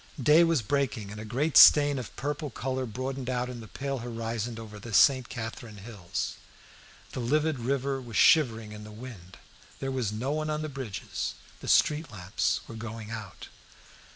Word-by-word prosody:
Day 150 +6 +6
was 165 -7 +2
breaking, 120 -4 -1
and 105 +1 -7
a - - -7
great 135 +8 -1
stain 145 -2 +8
of 120 - -8
purple 145 +2 -3
colour 130 +1 -3
broadened 130 +3 -4
out 125 0 -1
in 125 -1 -7
the 110 - -10
pale 135 +3 -4
horizon 115 -1 -4
over 105 -2 -9
the 110 0 -5
St. 130 -3 +5
Catherine 110 -2 -6
hills. 100 -4 -5 0.7
The - - -5
livid 150 +4 +1
river 135 +2 -1
was 115 -4 -5
shivering 115 -9 +4
in 105 0 -9
the 105 - -10
wind; 105 -6 -10 0.4
there 135 0 -3
was 125 -6 -1
no 120 +6 -2
one 155 +1 -1
on 155 0 -2
the 155 - -3
bridges; 130 -8 -5 0.2
the - - -9
street 150 +1 +3
lamps 95 -3 -1
were - - -9
going 110 -1 -7
out. 110 -5 -8
120 Hz, 180 wpm, -28 LUFS, 110-140 Hz, 0.7 s, stain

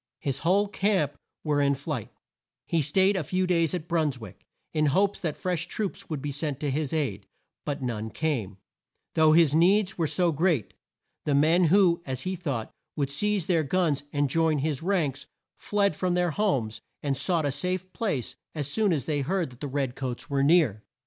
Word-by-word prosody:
His 135 -2 -2
whole 195 +5 +2
camp 195 -8 +1 0.3
were 150 -2 +1
in 140 0 +3
flight. 140 -4 -4 0.6
He 165 - +1
staid 190 +7 +3
a 185 - 0
few 185 +6 0
days 170 -2 +2
at 180 - -2
New - - -20
Bruns 160 -6 0
wick, 110 -5 -12 0.3
in 155 -1 +2
hopes 195 +7 +2
that 160 -5 -2
fresh 180 -3 -2
troops 210 -3 -4
would 150 -4 -4
be 145 - -2
sent 145 -1 -3
to 145 -2 0
his 145 0 -1
aid, 125 -11 -2 0.4
but 145 -1 -3
none 110 -3 -3
came, 115 -10 -2 0.6
though 155 -1 +5
his 160 -3 +5
needs 185 +4 +3
were 165 - +2
so 170 +3 +1
great. 155 - +1 0.5
The 145 - +2
men 160 +5 +4
who, 175 0 +4
as 130 -4 -4
he 185 0 -2
thought, 140 -11 -3 0.2
would 140 -3 -1
seize 205 +4 0
their 170 -3 +2
guns 155 -1 +1
and 145 -1 +1
join 160 +2 +2
his 145 -1 -1
ranks, 165 -7 -1 0.3
fled 200 -5 +1
from 180 +1 0
their 180 -1 +1
homes 130 - 0 0.2
and 140 -2 0
sought 165 +1 +1
a 145 - +1
safe 185 +5 -2
place 170 - -2 0.2
as 145 -3 -2
soon 210 +6 +2
as 145 -7 0
they 150 -2 0
heard 170 0 -1
that 125 - -16
the 145 - -3
red 135 -2 -2
coats 130 -1 -4
were 140 -1 +2
near. 140 - +4
155 Hz, 195 wpm, -27 LUFS, 140-180 Hz, 0.6 s, though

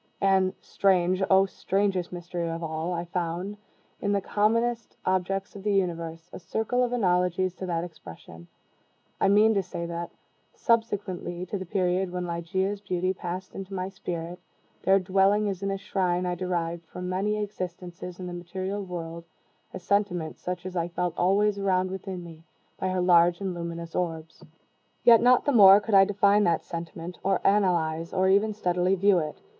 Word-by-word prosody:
And 190 -1 +3
(strange, 185 -1 +2
oh, 190 0 +6
strangest 195 -1 -1
mystery 175 -1 -4
of 165 +1 -4
all!) 160 +2 -3
I 170 0 -2
found, 175 +3 -3 0.5
in 205 0 0
the 200 - +2
commonest 225 +4 0
objects 190 +2 -1
of 200 - -8
the 205 0 0
universe, 165 -3 -2
a - - -7
circle 220 +8 -1
of 245 - -1
analogies 180 -4 +1
to 185 - -5
that 170 -1 -1
expression. 85 - -11 0.7
I - - +3
mean 210 +3 +5
to 200 - +2
say 175 -2 -6
that, 170 0 -5 0.5
subsequently 205 -7 -1
to 200 - -4
the 185 - -7
period 185 0 0
when 180 0 -3
Ligeia's 190 +4 -2
beauty 185 -1 -1
passed 185 0 -6
into 195 0 -7
my 185 0 -3
spirit, 175 -3 -6 0.4
there 195 +1 +4
dwelling 195 +2 +2
as 195 -2 -3
in 195 - -1
a 195 - -1
shrine, 180 -2 -1
I 180 - -1
derived, 170 -2 -3
from 180 +2 -7
many 195 +3 0
existences 180 -3 -6
in 185 - -5
the 180 - -6
material 185 +3 -4
world, 170 -2 -6 0.5
a - - -6
sentiment 180 -3 -1
such 180 0 -5
as 185 0 -6
I 170 -1 0
felt 175 0 -2
always 200 +3 +2
around, 185 -1 +1
within 190 -2 -6
me, 165 -2 -11 0.4
by 190 - -1
her 185 0 0
large 175 -1 +5
and 195 -2 -3
luminous 170 -1 -6
orbs. 165 -2 -4 0.6
Yet 230 -2 +7
not 250 +1 +5
the 290 - +3
more 200 -5 +9
could 210 +1 -5
I 195 0 +8
define 205 +1 +3
that 165 -2 +1
sentiment, 170 +1 -7
or 195 -1 +1
analyze, 170 -5 +1
or 190 0 +2
even 205 +2 +3
steadily 180 -1 +1
view 195 -1 +4
it. 155 -2 -5
185 Hz, 175 wpm, -27 LUFS, 175-195 Hz, 0.7 s, more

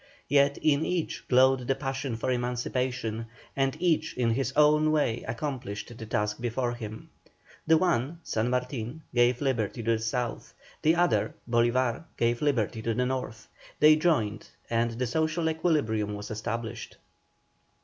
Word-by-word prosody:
Yet 140 0 +4
in 150 0 +3
each 175 -2 -2
glowed 130 0 +4
the 135 - +2
passion 135 -2 -3
for 115 +3 -1
emancipation, 125 -2 -2 0.3
and 135 +1 0
each 170 -6 +1
in 120 -2 +2
his 130 +4 0
own 150 +1 +5
way 145 -7 +1
accomplished 120 -4 -4
the 110 - -8
task 105 +1 -1
before 120 +1 -1
him. 110 -2 -8 0.6
The 160 0 +6
one, 165 -3 0
San 110 +2 -1
Martin, 125 +3 -3
gave 120 0 +3
liberty 120 -4 -1
to 115 - +1
the 115 - +1
South, 115 +1 -3 0.3
the 160 +2 +4
other, 175 +1 +1
Bolívar, 120 +3 +1
gave 120 0 +1
liberty 115 -7 0
to 115 0 -1
the 125 - +1
North. 125 -4 -4 0.3
They 155 +1 +8
joined, 130 -11 0 0.2
and 115 0 +2
the 125 +2 -2
social 160 +6 0
equilibrium 145 -11 0
was 105 +1 -7
established. 115 +2 -5
125 Hz, 150 wpm, -28 LUFS, 115-145 Hz, 0.6 s, They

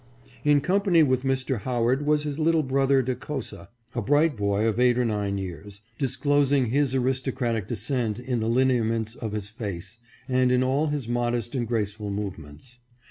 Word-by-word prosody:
In 145 -1 +4
company 185 -1 +3
with 130 -3 +2
Mr. 130 -2 -1
Howard 125 +5 0
was 150 0 +3
his 150 0 -4
little 160 0 +3
brother 135 0 +2
Decosa, 130 +2 -5 0.3
a 120 - -2
bright 145 +5 +3
boy 100 0 0
of 110 +1 0
eight 125 -1 +4
or 125 - +2
nine 105 -3 -1
years, 95 +2 -7 0.2
disclosing 140 -2 +2
his 140 -1 +1
aristocratic 130 -4 -1
de - - -3
scent 115 -1 -1
in 125 -1 -2
the 110 0 -1
lineaments 115 -3 +1
of 110 -4 -6
his 105 -1 -4
face, 105 -2 -6 0.3
and 130 -1 +2
in 125 0 +3
all 135 +4 +1
his 145 -5 -3
modest 120 -1 -1
and 120 -4 -1
graceful 105 -2 -2
movements. 100 - -7
125 Hz, 170 wpm, -25 LUFS, 110-135 Hz, 0.3 s, In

